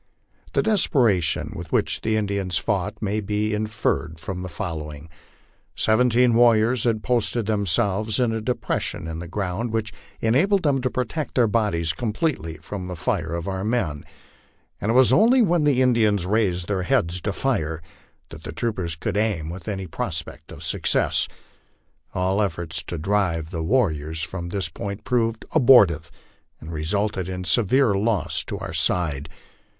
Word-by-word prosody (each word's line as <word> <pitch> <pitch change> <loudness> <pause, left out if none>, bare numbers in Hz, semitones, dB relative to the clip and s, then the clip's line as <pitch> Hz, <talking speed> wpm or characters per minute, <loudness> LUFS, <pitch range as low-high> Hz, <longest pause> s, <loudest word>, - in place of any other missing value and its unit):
The - - +2
desperation 120 - +2
with 85 -1 -8
which - - 0
the 110 0 0
Indians 100 -3 -1
fought 100 +1 -2
may 105 +1 0
be 105 +1 -1
inferred 105 -6 -2
from 90 +2 -5
the 90 - -5
following: 75 -2 -6 0.7
Seventeen 120 +2 +3
warriors 115 0 +4
had 110 -3 +1
posted 120 -2 +1
themselves 105 +1 +1
in 120 -2 +2
a 110 0 -2
depression 115 -7 -2
in 80 0 -5
the 85 - -6
ground, 100 +5 -3
which 110 -1 -2 0.3
enabled 175 - +2
them 140 -3 +2
to 130 - 0
protect 130 +5 -3
their 125 - +4
bodies 100 -7 +1
completely 110 - -2
from 95 -3 -7
the 90 - -5
fire 85 -1 -2
of 85 +1 -4
our 95 -1 -3
men, 95 -10 -1 0.8
and 105 - -2
it 115 - +2
was 130 -1 +6
only 235 - +5
when 175 -5 +2
the 130 -3 +3
Indians 110 -7 +2
raised 90 -4 0
their 100 -3 -1
heads 85 0 0
to 100 - -1
fire 80 - -1 0.5
that - - -10
the - - -7
troopers 95 -8 -2
could 80 - -3
aim 100 -8 -1
with 90 0 -9
any 95 -3 -3
prospect 85 - -5
of - - -9
success. - - +1 0.9
All 95 +3 +1
efforts 85 -4 -2
to 85 - -4
drive 85 -2 0
the 85 -3 -3
warriors 80 - 0
from 85 +1 -5
this 95 -2 -1
point 100 +5 -6
proved 115 -2 0
abortive, 105 - +5 0.5
and 80 +2 -8
resulted 95 +4 -1
in 90 0 -4
severe 110 - +3
loss 100 -1 0
to - - -4
our - - -6
side. 80 -4 +1
100 Hz, 160 wpm, -23 LUFS, 85-115 Hz, 0.9 s, was